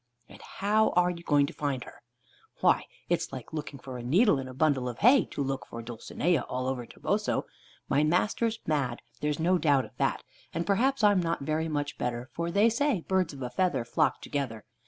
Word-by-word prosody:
"And - - -14
how 215 +2 +1
are 180 0 +4
you 170 -1 -7
going 145 -4 +3
to - - -7
find 140 -4 -2
her?" - - -14 0.6
"Why, - - +3 0.2
it's - - 0
like 130 +2 -8
looking 150 -2 -5
for 130 -1 -8
a - - -5
needle 160 - +4
in 130 - -5
a 130 - -8
bundle 135 -3 +2
of 120 - -7
hay, 245 - +6
to 140 - -4
look 135 0 -3
for 115 0 -7
Dulcinea 120 +8 -1
all 130 0 -2
over 130 -2 -3
Toboso. - - -1 0.4
My 145 +2 +2
master's 210 +8 +1
mad, 140 -6 -1 0.2
there's 150 +1 -1
no 180 +3 +2
doubt 145 -5 +3
of - - -16
that; - - 0 0.3
and 170 +1 -1
perhaps 245 +6 +2
I'm 205 -2 +5
not 165 -2 -1
very 155 +2 0
much 145 -2 -3
better, 120 +1 -3
for 170 0 -2
they 200 +5 +4
say 235 - +1
birds 185 -1 0
of 135 -2 -7
a 125 - -4
feather 180 -5 0
flock 155 +6 +1
together. 125 -7 -3
150 Hz, 205 wpm, -29 LUFS, 130-185 Hz, 0.6 s, hay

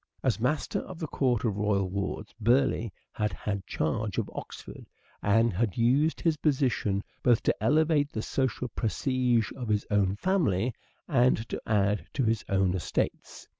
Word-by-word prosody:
As 125 -4 +1
master 140 +6 0
of 185 - -8
the 165 - -3
court 130 -4 0
of 105 -3 0
royal 100 -2 +1
wards, 100 +2 -4
Burleigh 120 0 +2 0.2
had 105 -1 -2
had 100 -4 -4
charge 100 +6 -2
of - - -2
Oxford - - -9 0.3
and 115 +2 +3
had 105 0 -1
used 135 +7 +2
his 165 -2 +2
position 130 -9 +1 0.2
both 120 -2 +3
to - - 0
elevate 150 -1 +3
the 110 - -3
social 130 -2 -1
prestige 120 0 0
of 125 -3 -5
his 105 -1 +1
own 100 -2 +2
family 125 - +1 0.3
and 125 -6 +2
to - - -4
add 105 -1 +1
to 135 - 0
his 115 -1 +1
own 95 -2 +2
estates. 90 -3 -3
115 Hz, 160 wpm, -28 LUFS, 105-135 Hz, 0.3 s, and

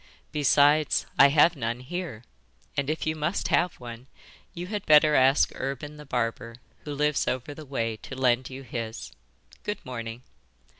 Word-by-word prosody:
Besides, 145 +1 +3
I 140 - +10
have 150 +4 +5
none 120 -2 -3
here, 140 -5 -5 0.5
and 140 0 -1
if 155 - -2
you 155 0 0
must 155 +5 -1
have 175 0 +2
one 120 +1 -9 0.5
you 175 +1 -5
had 205 +1 -4
better 150 0 +6
ask 135 +1 +4
Urban 140 +3 -5
the 150 -1 -12
barber, 115 -1 -2 0.3
who 145 -1 -4
lives 150 0 +1
over 130 +3 -2
the 155 +1 -10
way, 115 -5 -2
to 135 - -9
lend 125 -1 +1
you 135 +1 -8
his. 110 - -6 0.5
Good 210 - -4
morning. 115 -1 -6
135 Hz, 160 wpm, -27 LUFS, 120-150 Hz, 0.5 s, I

